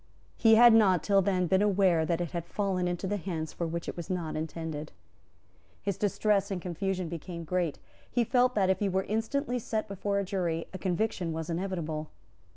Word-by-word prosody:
He 225 -1 +6
had 240 +1 +8
not 190 -7 +5
till 200 -1 +4
then 185 -1 +1
been 190 +3 +3
aware 190 -6 +3
that 170 -1 0
it 175 -3 -3
had 170 -1 -4
fallen 190 -2 -1
into 180 +3 -2
hands 165 -4 -4
for 170 - -2
which 170 +1 -4
it - - -4
was 170 -2 -7
not 175 -4 -2
intended. 155 -1 -4 0.9
His 200 -2 -2
distress 200 0 +1
and 195 -3 -2
confusion 185 +1 -2
became 170 +1 -6
great. 175 -2 -1 0.3
He 240 - +1
felt 250 +2 +2
that, 190 -2 +3
if 190 - 0
he 205 - +1
were 190 +1 0
instantly 245 +5 -1
sent 220 -1 -2
before 200 0 -2
a 200 - +1
jury, 175 -4 -2
a 185 - -6
conviction 180 -2 -1
was 160 +1 -4
inevitable. 165 -4 -3
185 Hz, 190 wpm, -29 LUFS, 170-200 Hz, 0.9 s, had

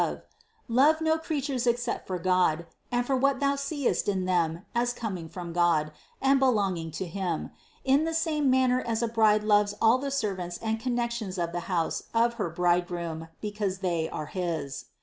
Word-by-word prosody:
Love 275 +7 +4
no 320 0 +2
creatures 280 -6 -2
ex 240 0 +2
cept 240 - -3
for 185 - -2
God, 180 -2 +2 0.3
and 245 0 +1
for 270 - +1
what 270 +1 +2
thou 280 0 +2
seest 280 -5 -1
in 190 -2 0
them 170 -1 0
as 240 +1 +1
coming 190 -9 -5
from 170 0 -7
God 165 -3 +2 0.3
and 270 0 +4
belonging 200 -10 +1
to 175 +4 -4
Him, 175 -2 -3 0.3
in 275 +3 +4
the 325 0 -1
same 310 -4 +1
manner 255 -1 +3
as 230 -1 -1
a - - +2
bride 215 -2 +3
loves 205 -1 +3
all 230 +3 +5
the 280 +1 -3
servants 190 -10 -2
and 220 0 -2
connections 235 -5 -2
of 170 -1 -1
the 175 - -2
house 170 -3 -1
of 235 +1 +3
her 175 - 0
bridegroom 175 -1 -1
because 205 -2 -2
they 170 -3 0
are 155 - -4
his. 160 -6 -3
210 Hz, 180 wpm, -28 LUFS, 175-255 Hz, 0.3 s, all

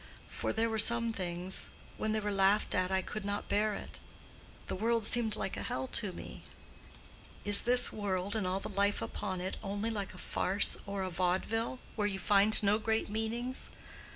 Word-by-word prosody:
For - - -2
there 225 +1 +1
were 220 -1 0
some 235 +1 +6
things—when 185 +3 -3
they 215 - +1
were 210 -1 -2
laughed 195 +1 +2
at 185 -1 +1
I 190 0 0
could 215 +3 -6
not 205 0 -3
bear 210 0 +1
it: - - -9 0.7
the - - -4
world 225 +2 +1
seemed 225 -2 +3
like 190 - -3
a - - -5
hell 130 - -3
to 205 -4 +2
me. - - -9 1.0
Is 205 -1 +7
this 245 0 +2
world 200 -1 -2
and 210 -4 0
all 185 +1 0
the - - -6
life 200 0 0
upon 190 -3 -4
it 185 +1 -4
only 205 +2 -2
like 200 -4 -4
a - - -11
farce 195 +2 +3
or 200 -1 -3
a 185 - -4
vaudeville, 190 +8 -1 0.2
where 210 -2 0
you 195 -2 -3
find 205 +3 +3
no 205 +1 +3
great 220 -1 -1
meanings? 235 +4 -2
205 Hz, 185 wpm, -32 LUFS, 190-220 Hz, 1.0 s, Is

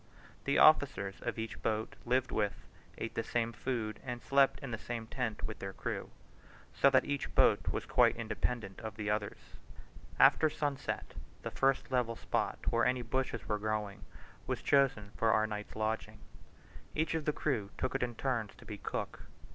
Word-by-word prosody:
The 140 - +2
officers 140 -11 +5
of - - -3
each 110 0 -5
boat 110 0 -1
lived 125 0 +2
with, 105 -3 -1 0.3
ate 115 - -4
the - - 0
same 115 0 -1
food, 110 -2 -3
and 125 -2 -4
slept 135 +2 +3
in 135 -3 -5
the 115 - -3
same 120 -2 -4
tent 115 -2 -3
with 110 - -4
their 95 0 -5
crew, - - -4 0.6
so 140 - +5
that 130 -1 +4
each 145 -1 -3
boat - - +5
was - - -1
quite - - +4
independent 115 -3 -3
of 110 -2 -6
the 105 -1 -2
others. 105 -1 -1 0.8
After 155 - +6
sunset 145 -2 -3 0.3
the - - -4
first 135 0 +1
level 120 -3 +1
spot - - -1
where 115 0 +3
any 125 -1 +1
bushes 125 0 -2
were 105 -1 0
growing, 105 -1 -2 0.4
was - - -2
chosen 135 -8 +3
for 115 -1 +3
our 110 0 +4
night's 105 -1 -5
lodging. 110 +1 -2 0.8
Each 160 +2 +1
of 160 -2 -1
the 150 - +3
crew 125 -10 -1
took 130 - -1
it 135 - -1
in 120 -1 -1
turns 115 -5 -1
to - - -15
be 105 -2 -7
cook. - - -4
115 Hz, 180 wpm, -33 LUFS, 110-130 Hz, 0.8 s, After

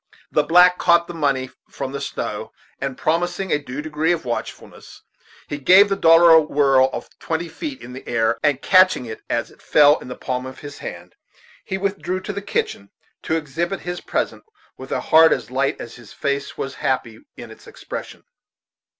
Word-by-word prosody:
The - - +3
black 180 +4 +5
caught 170 0 +4
the 175 - -8
money 140 -5 -1 0.2
from 135 -1 -5
the 140 0 -5
snow, 140 - -5 0.3
and 135 -1 -4
promising 175 +4 -1
a 150 - +2
due 145 0 -7
degree 155 +2 0
of 165 -5 -2
watchfulness, 120 -1 -7 0.4
he 145 - -5
gave 190 +8 +6
the 195 - +1
dollar 165 -2 +6
a 160 0 +8
whirl 135 -3 +3
of - - -6
twenty 165 +1 -3
feet 280 - -7
in 125 - -10
the 130 - -10
air, 115 -2 +1
and 145 -3 +1
catching 185 -8 +4
it 110 -1 -8
as 120 - -2
it - - -21
fell 150 0 +5
in - - -11
the 125 - -6
palm 130 0 -4
of 130 - -11
his 145 -1 -9
hand, - - -8 0.5
he 190 - -4
withdrew 190 -1 -2
to 205 - -5
the 200 - -5
kitchen, 445 - -3 0.3
to 160 - -1
exhibit 165 +5 -3
his 175 0 -5
present, - - -3 0.3
with - - -11
a - - -1
heart 160 0 +6
as 125 -1 -2
light 135 +2 0
as 120 - -8
his 120 -4 -15
face 140 0 -3
was 135 - -4
happy 115 -4 -2 0.2
in - - -10
its - - -15
expression. - - -8
150 Hz, 195 wpm, -21 LUFS, 130-175 Hz, 0.5 s, a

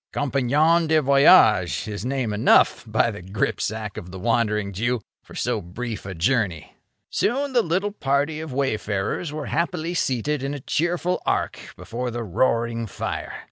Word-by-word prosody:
Compagnon 145 +5 +2
de 155 0 +4
voyage 135 - +5
is 105 -1 -5
name 125 -4 -1
enough, 105 - +4
by - - +2
the - - -8
gripsack 105 +2 -3
of 90 - -7
the 95 - -8
Wandering 105 -1 0
Jew! 120 +5 0 0.2
for - - -14
so 120 -3 -1
brief 105 +4 -6
a 95 - -6
journey. 95 - 0 0.4
Soon 275 +4 0
the 245 - +5
little 190 +3 -1
party 145 -3 0
of 160 -2 -6
wayfarers 120 - -2
were 150 -1 -5
happily 170 0 -1
seated 140 -2 -1
in 140 +1 -3
a - - -6
cheerful 175 +6 -1
arc - - -1 0.2
before 125 +2 -4
the 120 0 -4
roaring 115 +3 0
fire. 95 - -5
125 Hz, 155 wpm, -23 LUFS, 105-155 Hz, 0.4 s, voyage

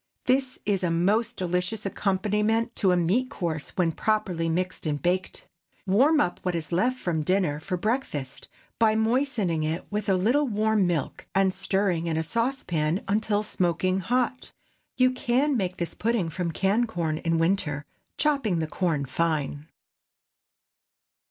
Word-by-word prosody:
This 260 0 +1
is 200 -2 +1
a 175 - +2
most 210 +8 +1
delicious 180 +4 -2
accompaniment 210 +4 0
to 190 -3 +3
a 180 - +3
meat 200 +10 +1
course, 160 -5 -3
when 175 -3 +2
properly 185 -3 0
mixed 180 0 -2
and 145 -1 -1
baked. 180 +3 -2 0.4
Warm 270 +11 +4
up 175 - 0
what 180 -2 -1
is 165 0 -4
left 245 +9 +1
from 170 -8 -1
dinner 175 -3 +1
for 180 +4 -3
breakfast, 180 - -3 0.3
by 220 -1 +4
moistening 220 - +1
it 155 +2 -2
with 210 0 -2
a 190 - +4
little 245 +11 +2
warm 215 -3 +2
milk, 165 -6 -2
and 195 -1 +3
stirring 190 -3 0
in 160 -1 0
a 160 - 0
saucepan 180 - -1
until 210 +1 +1
smoking 185 -1 0
hot. 250 +5 -1 0.5
You 255 0 +4
can 255 +3 +1
make 185 -5 -1
this 170 - -2
pudding 220 -6 0
from 170 +1 -3
canned 200 +8 +1
corn 165 -7 -2
in 165 0 0
winter, 165 -4 0 0.3
chopping 275 - +1
the 160 - 0
corn 155 -3 -1
fine. 150 0 -1
190 Hz, 150 wpm, -26 LUFS, 170-225 Hz, 0.5 s, Warm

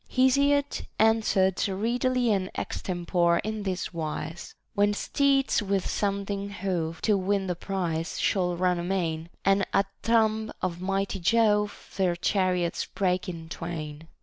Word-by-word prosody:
Hesiod 280 +2 +2
answered 215 -4 +3
readily 240 +4 +1
and 190 -2 0
extempore 175 -1 0
in 215 +1 -3
this 185 -2 -3
wise 160 +1 -5
' - - -50
— - - -48
When 205 0 +2
steeds 275 +1 +2
with 200 -2 0
sounding 200 0 -2
hoof, 180 -5 -3
to 215 - +4
win 195 +1 0
The 180 -2 -2
prize, 175 -3 -3
shall 180 -3 +1
run 180 -1 +1
amain; 170 -3 -2 0.2
And 195 0 +4
at 195 - +4 0.2
the 230 - -2
tomb 220 -1 +2
of 175 -1 -3
mighty 195 +1 -1
Jove 210 +1 +1
Their 185 -3 +2
chariots 180 -1 0
break 185 -1 -1
in 165 -2 -7
twain. 160 -2 -6
195 Hz, 145 wpm, -27 LUFS, 175-210 Hz, 0.2 s, to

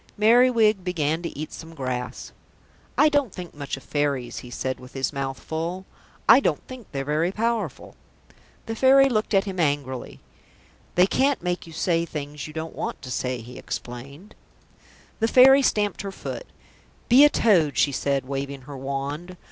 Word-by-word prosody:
Merriwig 220 -2 +4
began 165 -3 -1
to 170 - -6
eat 155 +1 -6
some 165 0 -10
grass. 130 -3 -4 0.7
"I 300 - +6
don't 290 -6 +1
think 175 -1 -8
much 140 -2 -5
of 135 - -13
Fairies," 140 -4 -1
he 125 - -11
said 130 +2 -3
with 125 0 -13
his 135 +2 -2
mouth 135 -2 -3
full. 170 +7 -4 0.4
"I 230 +4 +9
don't - - -1
think 255 -4 -10
they're 135 -1 -3
very 155 +5 +1
powerful." 230 +2 -2 0.7
The 225 - -4
Fairy 270 +3 +6
looked 215 -3 0
at 195 - +4
him 190 -3 -5
angrily. 140 -5 -2 0.8
"They 180 - +6
can't 270 +3 +1
make 180 -1 -2
you 165 - -11
say 165 +1 +1
things 150 -2 -6
you - - -9
don't 160 +1 -5
want - - -5
to 130 - -7
say," 125 -1 -2
he 120 +2 -10
explained. 140 - -8 0.9
The 225 - +2
Fairy 265 +3 +7
stamped 205 -6 +1
her 195 0 -5
foot. - - -7 0.6
"Be 255 +4 +7
a 295 - +8
toad," 175 - +3
she 145 - +3
said, 135 -1 -1
waving 140 0 -4
her 140 +2 -10
wand. 140 +6 -5
165 Hz, 170 wpm, -24 LUFS, 140-215 Hz, 0.9 s, I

